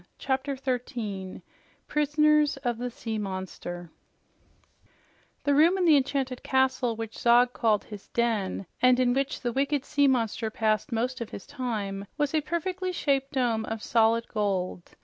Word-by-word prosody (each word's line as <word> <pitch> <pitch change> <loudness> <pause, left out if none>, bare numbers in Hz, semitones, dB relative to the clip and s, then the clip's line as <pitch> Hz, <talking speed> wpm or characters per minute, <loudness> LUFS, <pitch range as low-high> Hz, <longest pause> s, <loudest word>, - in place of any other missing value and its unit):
CHAPTER 270 +1 -1
13 235 -7 -4 0.4
PRISONERS 300 0 +3
OF 240 -2 -1
THE 245 0 -2
SEA 225 -2 -4
MONSTER 185 -3 -6 1.5
The 285 - +2
room 325 +6 +5
in 365 - +1
the 320 -3 +7
enchanted 265 -2 0
castle 265 -3 +1
which 225 0 -6
Zog 245 +1 +4
called 215 -3 +1
the 210 -2 -8
"den" 220 -5 0 0.2
and 255 0 +5
in 245 -1 +3
which 275 +1 -1
the 240 -2 -2
wicked 280 +1 0
sea 285 -1 +3
monster 230 -3 0
passed 215 -1 0
most 245 +2 -1
of 235 - -4
his 200 - -8
time 215 -8 -4
was 295 0 0
a 310 - +2
perfectly 365 +4 -2
shaped 275 -5 0
dome 240 -4 +1
of 225 -1 -5
solid 230 0 +3
gold. 190 -4 -2
245 Hz, 150 wpm, -27 LUFS, 220-275 Hz, 1.5 s, the